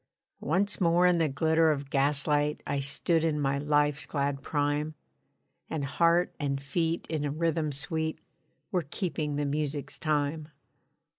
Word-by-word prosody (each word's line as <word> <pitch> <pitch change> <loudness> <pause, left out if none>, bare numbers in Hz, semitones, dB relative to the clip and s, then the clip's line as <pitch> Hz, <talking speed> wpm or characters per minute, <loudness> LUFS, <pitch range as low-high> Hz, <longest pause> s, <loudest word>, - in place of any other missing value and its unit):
Once 195 +7 0
more 175 +1 +4
in 180 -1 +4
the 160 -2 +2
glitter 160 +3 +3
of 140 -2 -2
gaslight 145 +1 +1
I 140 - -1
stood 160 +4 +1
in 155 -2 +1
my 140 -1 0
life's 145 0 +1
glad 140 -1 -1
prime: 145 +1 -1 0.7
And 150 -3 -2
heart 170 +5 +2
and 140 -2 -1
feet 165 +4 -1
in 155 -2 -2
a 145 - 0
rhythm 160 0 0
sweet 160 +3 -3 0.5
Were 175 -6 -1
keeping 155 -5 -2
the 145 0 -1
music's 145 0 -2
time. 150 0 0
150 Hz, 145 wpm, -29 LUFS, 145-165 Hz, 0.7 s, more